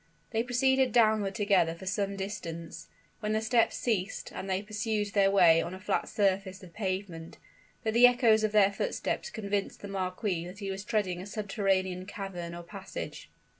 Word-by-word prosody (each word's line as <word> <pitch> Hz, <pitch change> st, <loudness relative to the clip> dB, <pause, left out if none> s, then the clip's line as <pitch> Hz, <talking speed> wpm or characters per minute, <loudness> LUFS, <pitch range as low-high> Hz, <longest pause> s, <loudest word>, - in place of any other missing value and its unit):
They 225 Hz, -1 st, +1 dB
proceeded 260 Hz, +1 st, +2 dB
downward 215 Hz, -4 st, +3 dB
together 195 Hz, -6 st, +2 dB
for 190 Hz, -, -11 dB
some 195 Hz, +1 st, -1 dB
distance, 170 Hz, -5 st, -6 dB, 0.3 s
when 215 Hz, 0 st, -1 dB
the 215 Hz, -, +2 dB
steps 225 Hz, +1 st, +2 dB
ceased, 200 Hz, -5 st, -2 dB
and 195 Hz, -, -6 dB
they 190 Hz, +1 st, 0 dB
pursued 215 Hz, 0 st, -2 dB
their 195 Hz, -1 st, +4 dB
way 175 Hz, -4 st, +6 dB
on 175 Hz, +2 st, -5 dB
a -, -, -10 dB
flat 190 Hz, -, -1 dB
surface 195 Hz, -1 st, 0 dB
of 175 Hz, -2 st, -13 dB
pavement; 185 Hz, -5 st, -4 dB, 0.5 s
but 220 Hz, -2 st, 0 dB
the 240 Hz, +2 st, +8 dB
echoes 235 Hz, -3 st, +4 dB
of 215 Hz, -, +1 dB
their 205 Hz, -2 st, +5 dB
footsteps 485 Hz, -, -2 dB
convinced 200 Hz, -2 st, -3 dB
the 205 Hz, -, -6 dB
marquis 185 Hz, -2 st, -2 dB
that 180 Hz, +2 st, -10 dB
he 200 Hz, -2 st, -4 dB
was 195 Hz, +1 st, -5 dB
treading 205 Hz, -6 st, -1 dB
a 190 Hz, -, -8 dB
subterranean 195 Hz, -3 st, -1 dB
cavern 180 Hz, -4 st, -6 dB
or 175 Hz, -, -8 dB
passage. 195 Hz, +2 st, -8 dB
200 Hz, 175 wpm, -30 LUFS, 185-215 Hz, 0.5 s, the